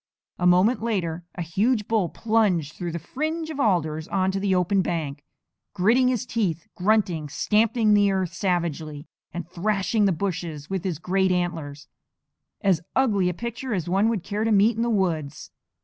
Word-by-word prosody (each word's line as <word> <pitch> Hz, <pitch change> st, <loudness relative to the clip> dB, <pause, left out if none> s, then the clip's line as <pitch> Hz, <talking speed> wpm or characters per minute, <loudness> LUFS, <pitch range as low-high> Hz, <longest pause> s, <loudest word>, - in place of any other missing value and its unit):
A 180 Hz, -, +3 dB
moment 185 Hz, +8 st, +4 dB
later 175 Hz, -7 st, -2 dB
a 175 Hz, -, -3 dB
huge 210 Hz, +6 st, 0 dB
bull 215 Hz, -6 st, +1 dB
plunged 200 Hz, -10 st, +1 dB
through 175 Hz, -2 st, -5 dB
the 170 Hz, -, -3 dB
fringe 315 Hz, -, -3 dB
of 295 Hz, -, -7 dB
alders 160 Hz, -, +1 dB
onto 190 Hz, 0 st, 0 dB
the 195 Hz, -1 st, +1 dB
open 185 Hz, +2 st, +2 dB
bank, 150 Hz, -6 st, -3 dB, 0.5 s
gritting 230 Hz, +7 st, +4 dB
his 250 Hz, 0 st, 0 dB
teeth, 190 Hz, -10 st, -1 dB
grunting, 180 Hz, -6 st, +1 dB
stamping 215 Hz, -, +2 dB
the 205 Hz, -1 st, +4 dB
earth 185 Hz, -3 st, -1 dB
savagely, 165 Hz, -5 st, -2 dB, 0.3 s
and 170 Hz, -2 st, -6 dB
thrashing 205 Hz, +4 st, 0 dB
the 195 Hz, -, +3 dB
bushes 165 Hz, -4 st, -4 dB
with 190 Hz, -3 st, -2 dB
his 180 Hz, -5 st, -1 dB
great 190 Hz, +3 st, +1 dB
antlers 165 Hz, -5 st, -3 dB, 0.7 s
as 185 Hz, -5 st, +2 dB
ugly 205 Hz, -9 st, +2 dB
a -, -, -2 dB
picture 235 Hz, +2 st, -4 dB
as 175 Hz, -4 st, -3 dB
one 195 Hz, +5 st, +2 dB
would 215 Hz, -6 st, -1 dB
care 205 Hz, +2 st, -2 dB
to 225 Hz, -, +1 dB
meet 210 Hz, +2 st, +4 dB
in 230 Hz, -, -2 dB
the 235 Hz, -, +1 dB
woods. 165 Hz, -9 st, -1 dB
190 Hz, 170 wpm, -24 LUFS, 170-215 Hz, 0.7 s, moment